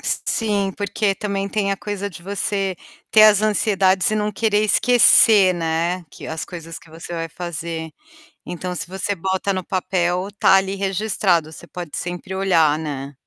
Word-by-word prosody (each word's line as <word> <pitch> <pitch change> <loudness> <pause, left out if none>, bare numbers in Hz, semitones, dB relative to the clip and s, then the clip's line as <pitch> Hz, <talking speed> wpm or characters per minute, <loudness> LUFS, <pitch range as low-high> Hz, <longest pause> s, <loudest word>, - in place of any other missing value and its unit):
S - - -1
sim, 205 -4 0
porque 205 0 -1
também 200 0 -3
tem 200 0 -1
a 195 - -1
coisa 205 0 -4
de 175 -3 -12
você 195 0 -2 0.3
ter 215 - +6
as 210 -1 +5
ansiedades 195 -3 +2
e 215 - 0
não 210 0 -1
querer 215 0 +1
esquecer, 215 -3 +5
né, 170 +2 -1
que - - -11
as 160 0 -4
coisas 165 -2 -8
que 150 - -20
você 165 +2 -9
vai 165 -1 -4
fazer. 165 -1 -6 0.6
Então 180 +1 -5
se - - -4
você 190 +2 -3
bota 190 +2 -1
no 185 -1 -3
papel, 180 0 -1
tá - - +5
ali 195 0 +1
registrado, 195 -4 0
você 160 - -11
pode 175 -4 -8
sempre 180 +2 -5
olhar, 165 -6 +3
né. 145 -3 -6
190 Hz, 170 wpm, -20 LUFS, 170-200 Hz, 0.6 s, ter